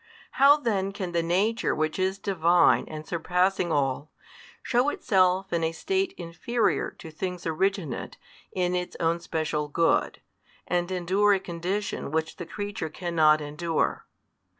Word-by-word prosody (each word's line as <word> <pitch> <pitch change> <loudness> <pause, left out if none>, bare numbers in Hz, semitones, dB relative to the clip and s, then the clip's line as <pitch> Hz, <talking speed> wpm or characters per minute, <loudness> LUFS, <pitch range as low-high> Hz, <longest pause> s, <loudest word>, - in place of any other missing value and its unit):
How 280 +2 +6
then 200 -8 -1
can 190 -3 -4
the 170 -1 +1
Nature 195 +7 +1
Which 155 +3 -1
is 190 +1 0
Divine 175 -3 +3
and 155 0 -7
surpassing 180 +2 0
all, 140 0 0 0.5
shew 250 +4 +2
Itself 190 -6 +1
in 170 -1 +1
a 160 - +1
state 385 - -1
inferior 175 +8 -1
to 160 - -10
things 180 +2 -5
originate 170 - -2 0.3
in 180 -1 0
Its 180 0 -3
own 165 +1 +1
special 155 -3 -2
good, 165 +3 +1 0.5
and 175 0 -1
endure 190 +3 +2
a - - -1
condition 185 +2 -3
which 160 +1 -2
the 175 -4 -7
creature 205 -4 -4
cannot 155 -2 +2
endure? 155 +3 -2
175 Hz, 140 wpm, -26 LUFS, 160-195 Hz, 0.5 s, How